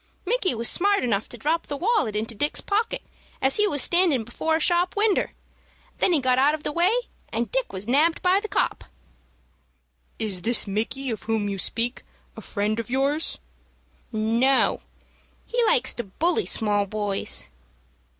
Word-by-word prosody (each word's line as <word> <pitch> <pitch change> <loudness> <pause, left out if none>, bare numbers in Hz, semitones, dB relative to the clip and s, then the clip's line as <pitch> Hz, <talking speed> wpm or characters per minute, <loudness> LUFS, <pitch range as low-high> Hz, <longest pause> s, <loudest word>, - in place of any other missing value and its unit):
"Micky 410 - +1
was 230 +1 -1
smart 400 -1 +3
enough 220 -4 -1
to 240 - -7
drop 315 +7 -1
the 285 - -4
wallet 370 - +1
into 220 +2 -1
Dick's 290 +8 +1
pocket 430 +3 -1 0.4
as 265 0 +3
he 420 0 +4
was 290 -8 +2
standin' 345 -9 +3
before 315 +8 -1
a - - +1
shop 350 +2 +1
winder. 415 -1 +1 0.7
Then - - +3
he 330 - +4
got 255 -1 +2
out 290 +3 +4
of 310 - -11
the - - -2
way, 345 +5 +2 0.4
and 230 -1 -3
Dick 265 0 -1
was 190 +2 -4
nabbed 305 +7 +2
by 370 +1 +4
the 435 - -5
'copp.'" - - -1 1.3
"Is 200 -5 -3
this 235 +3 +2
Micky 230 +6 -2
of 215 -4 -4
whom 220 -2 -1
you 200 -1 -3
speak 235 +7 -2 0.3
a - - -9
friend 215 +1 -2
of 230 - -5
yours?" 275 +5 +1 0.7
"No; 230 +4 +2 0.6
he 480 0 0
likes 470 +2 +3
to 240 - -4
bully 340 - 0
small 205 -2 +1
boys." 205 -1 -2
265 Hz, 170 wpm, -24 LUFS, 220-345 Hz, 1.3 s, he